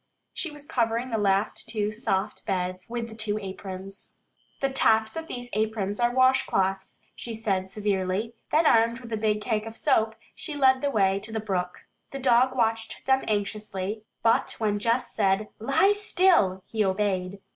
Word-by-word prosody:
She 340 - -2
was 295 -1 -9
covering 235 -1 0
the 225 - 0
last 200 0 0
two 210 -2 0
soft 210 -2 -2
beds 185 -1 -2
with 235 -1 -3
the 225 - -10
two 220 -1 -2
aprons. 195 -1 -7 0.4
"The 275 -1 0
tops 220 -3 +3
of 325 0 -5
these 245 -4 -6
aprons 215 -1 -1
are 240 0 +3
washcloths," 195 -7 +1
she 230 -2 -6
said 195 -4 -1
severely. 200 +1 -1 0.2
Then 315 +2 +4
armed 230 -2 +4
with 235 -2 -11
the - - 0
big 210 -1 0
cake 215 -1 -1
of 225 +1 -8
soap 225 -6 +2 0.2
she 305 - -5
led 260 -2 +4
the 285 - +1
way 195 -6 +2
to 220 - -9
the 220 - -2
brook. 185 -4 -3 0.3
The 275 - -6
dog 255 0 +3
watched 225 -2 -1
them 265 0 +3
anxiously, 210 -1 -2 0.2
but 225 - +2
when 210 -2 0
Jess 230 +4 0
said, 200 0 +1
"Lie 275 - +3
still," 360 - +3
he 220 -1 0
obeyed. 190 -1 -1
220 Hz, 170 wpm, -26 LUFS, 195-240 Hz, 0.4 s, Then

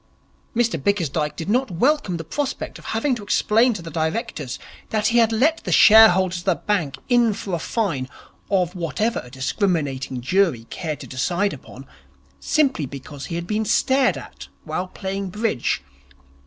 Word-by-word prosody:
Mr 225 - 0
Bickersdyke 155 -7 0
did 165 - -6
not 250 +5 +1
welcome 200 - +1
the 165 - -6
prospect 280 - -4
of - - -16
having 240 +5 0
to 240 - -4
explain 220 +4 +3
to 205 -7 -5
the 165 - -8
Directors 160 - -3 0.3
that 215 0 +1
he 235 0 +3
had 230 -1 +4
let 290 +9 +2
the - - -3
shareholders 190 -5 +7
of 175 - -12
the 190 -3 +3
bank 165 -10 -1
in 240 -3 +3
for 195 -1 -6
a 170 - 0
fine 160 - -2 0.4
of 180 -3 +1
whatever 185 +6 -1
a 125 - -12
discriminating 135 - -1
jury 135 -3 +1
cared 155 -5 -4
to - - -7
decide 180 +10 -1
upon, 135 -1 -11 0.5
simply 265 - +1
because 140 +1 -8
he 165 - -4
had 170 0 -3
been 215 +4 -1
stared 260 +5 +2
at - - -10 0.2
while 185 - -3
playing 195 +1 -4
bridge. 210 - -1
185 Hz, 170 wpm, -22 LUFS, 155-225 Hz, 0.5 s, shareholders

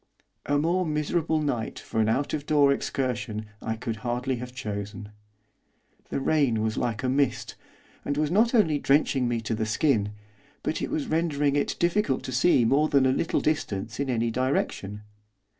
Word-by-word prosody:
A 145 - +2
more 170 +5 +1
miserable 155 0 0
night 120 -6 -2
for 110 - -2
an 110 - +2
out 135 +6 0
of 150 -1 -3
door 145 -2 +5
excursion 120 -6 -3 0.2
I 110 - -2
could 115 0 -4
hardly 125 +3 -2
have 125 +1 -7
chosen. 105 -4 -6 1.0
The - - -1
rain 135 -7 +2
was 110 -1 -1
like 120 -1 -2
a - - +1
mist, 135 -1 0 0.5
and 145 - -2
was 150 0 +1
not 230 +6 +3
only 160 -10 +3
drenching 135 -3 +2
me 120 -1 -1
to 115 - -3
the 110 0 -1
skin, 105 -4 +1 0.5
but - - -2
it - - -2
was 150 - -1
rendering 150 -3 +1
it 145 - 0
difficult 175 -6 +1
to - - -5
see 125 -1 +4
more 145 +6 +3
than 140 -2 +4
a 130 - +4
little 155 - 0
distance 110 -8 -2
in 140 -1 -1
any 115 -2 0
direction. 110 -5 -1
130 Hz, 175 wpm, -26 LUFS, 115-150 Hz, 1.0 s, door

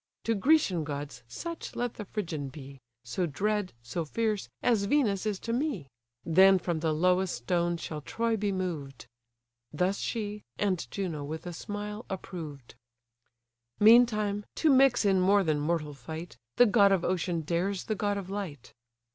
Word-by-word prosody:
To 230 - +1
Grecian 210 - +3
gods 145 -3 -5
such 335 - -6
let 245 -1 -2
the 210 - -7
Phrygian 165 -9 -4
be, 135 -1 -11 0.2
So 120 +10 -2
dread, 205 +5 -1
so 165 +8 -3
fierce, 210 - -1
as 220 -5 +3
Venus 215 -5 +1
is 210 -2 -1
to 230 - -3
me; 250 - -1 0.4
Then 190 +3 +6
from 175 -3 -2
the 160 0 0
lowest 180 +3 +2
stone 170 +7 0
shall 155 -2 -6
Troy 230 +8 -1
be 205 -1 -1
moved." 160 -9 -4 0.7
Thus 180 +6 0
she, 210 -2 -3 0.2
and 190 -4 -1
Juno 170 -7 -3
with 155 +4 -6
a 175 - -5
smile 210 +5 -6
approved. 160 - -7 1.1
Meantime, 215 -2 +5
to 315 - +3
mix 265 -4 +5
in 190 -2 +4
more 200 +2 +4
than 155 -4 +1
mortal 150 -1 -1
fight, 160 +6 -8 0.2
The 245 - +8
god 200 -3 +5
of 190 -3 +2
ocean 175 -2 0
dares 175 +5 -1
the 220 - -2
god 205 -1 -1
of 195 -2 -5
light. 180 - -6
190 Hz, 160 wpm, -29 LUFS, 160-210 Hz, 1.1 s, The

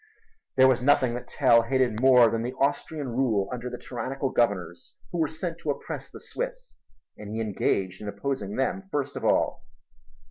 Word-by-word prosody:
There 130 0 +7
was 130 -2 +3
nothing 130 -2 +3
that 120 - -6
Tell 120 -4 +4
hated 120 -2 0
more 125 -2 +7
than 115 - -1
the 120 +2 -3
Austrian 140 +1 -1
rule 115 -5 +1
under 125 0 -4
the - - -6
tyrannical 135 +2 -4
governors 90 -7 -1 0.2
who 175 - -3
were 160 - +2
sent 165 +2 -5
to 155 - -5
oppress 140 - -4
the - - -11
Swiss, - - -6 0.5
and 105 -1 -8
he - - -2
engaged 95 -3 -1
in 105 - -6
opposing 105 -3 -3
them 190 +9 -2
first 140 -1 -2
of - - -5
all. - - +1
130 Hz, 180 wpm, -26 LUFS, 115-140 Hz, 0.5 s, There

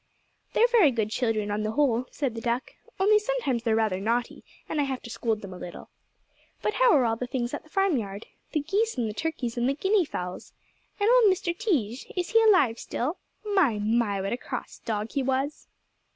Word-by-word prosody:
"They're 460 - +5
very 445 -11 +6
good 220 -4 -1
children, 220 -3 0
on 210 +1 -1
the 215 +1 -2
whole," 255 -4 +2
said 275 -6 -2
the 230 - -6
duck, 240 +2 -2 0.3
"only 420 +2 +5
sometimes 425 - -1
they're 225 -1 +1
rather 215 -4 +1
naughty, 230 +4 -1 0.2
and 300 - 0
I - - +1
have 265 -2 -4
to 235 - -8
scold 225 -3 -1
them 195 -2 -7
a 180 - -9
little. 175 - -9 0.7
But 425 - +1
how - - +5
are 265 -4 +4
all 225 -1 +1
the 250 - -4
things 245 -1 -2
at - - -3
the 310 - -22
farmyard? 245 - 0 0.3
The 305 - +1
geese 410 +8 0
and 235 -2 0
the 210 - -4
turkeys 250 -4 -3
and 240 +2 +2
the 275 - 0
guinea 385 +4 +2
fowls? 180 -9 -6 0.5
And 410 - +2
old 475 -4 +6
Mr. 345 -2 -1
Tige? 275 - -1
Is 360 -1 -1
he 455 - +6
alive 370 - +4
still? 295 +9 -3 0.3
My, 380 - +2
my! 210 -1 +1
What 195 +3 -2
a - - -1
cross - - -6
dog 215 0 -3
he 280 - 0
was." 270 +2 -2
255 Hz, 210 wpm, -27 LUFS, 225-360 Hz, 0.7 s, very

